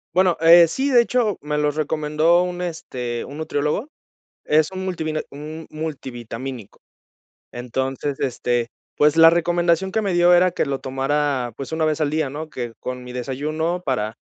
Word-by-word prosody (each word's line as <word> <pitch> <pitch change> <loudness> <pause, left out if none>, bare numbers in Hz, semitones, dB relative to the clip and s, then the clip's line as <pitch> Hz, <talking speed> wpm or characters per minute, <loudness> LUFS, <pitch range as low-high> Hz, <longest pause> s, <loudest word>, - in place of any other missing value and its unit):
Bueno, 185 -2 +3
eh, 165 0 +7
sí, 270 - -1
de 240 -2 +7
hecho, 235 -5 0
me 150 0 -2
los 150 -1 0
recomendó 155 +2 +2
un, 180 0 -4
este, 125 -9 -4
un 140 - -10
nutriólogo, 155 - -2 0.6
es 155 +2 +3
un 190 0 -5
multivina 160 -4 -2
un 155 +3 -8
multivitamínico, 130 -6 -7 0.7
entonces, 130 +3 -3
este, 120 -2 -1 0.3
pues 150 +2 +3
la 165 0 +9
recomendación 175 +2 +1
que 220 - 0
me 195 -3 -1
dio 175 0 +5
era 180 0 +5
que 170 - -1
lo 135 -1 -2
tomara, 135 -1 -1
pues 135 +3 -6
1 160 - 0
vez 155 0 +1
al 150 -2 0
día, 155 -3 0
¿no? 155 +3 -6
Que 120 -4 -5
con 125 0 -5
mi 125 - -9
desayuno 155 +8 -3
para, 110 -4 -1
155 Hz, 170 wpm, -22 LUFS, 135-170 Hz, 0.7 s, la